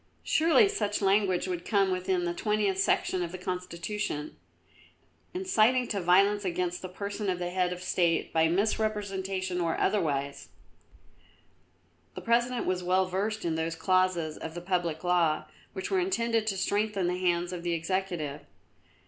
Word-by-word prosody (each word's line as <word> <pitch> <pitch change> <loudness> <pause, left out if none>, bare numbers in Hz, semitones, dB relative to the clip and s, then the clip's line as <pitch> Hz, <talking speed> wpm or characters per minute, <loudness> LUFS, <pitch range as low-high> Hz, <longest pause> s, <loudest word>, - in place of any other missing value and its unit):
Surely 330 +7 +4
such 300 - -1
language 195 -2 +2
would 180 -2 -3
come 195 -2 +2
within 185 0 0
the 175 - -1
20th 210 0 0
Section 185 -1 +1
of 170 -1 -3
the 185 - -6
Constitution: 180 -3 -4 1.0
Inciting 255 -9 +2
to 200 -3 -1
violence 200 +4 +4
against 180 -1 -2
the 185 - -6
person 200 +2 -4
of 180 - 0
the 175 0 -3
Head 180 -1 +1
of 180 0 -5
the - - -8
State 170 -3 +1
by 160 0 +4
misrepresentation 195 -1 -1
or 165 -1 0
otherwise." 140 -8 -1 1.7
The - - -6
President 240 +1 +1
was 185 -1 0
well 185 +1 +2
versed 200 +4 -2
in 165 - 0
those 160 +1 -2
clauses 185 -3 +1
of 160 +1 -7
the - - -3
public 175 -3 -1
law 175 -3 +2 0.3
which 190 -2 -5
were 385 - +3
intended 230 - 0
to 195 -3 0
strengthen 205 0 0
the 180 +1 -1
hands 175 -1 0
of 175 - -5
the 170 0 -1
Executive. 165 -4 -2
185 Hz, 155 wpm, -29 LUFS, 175-205 Hz, 1.7 s, Surely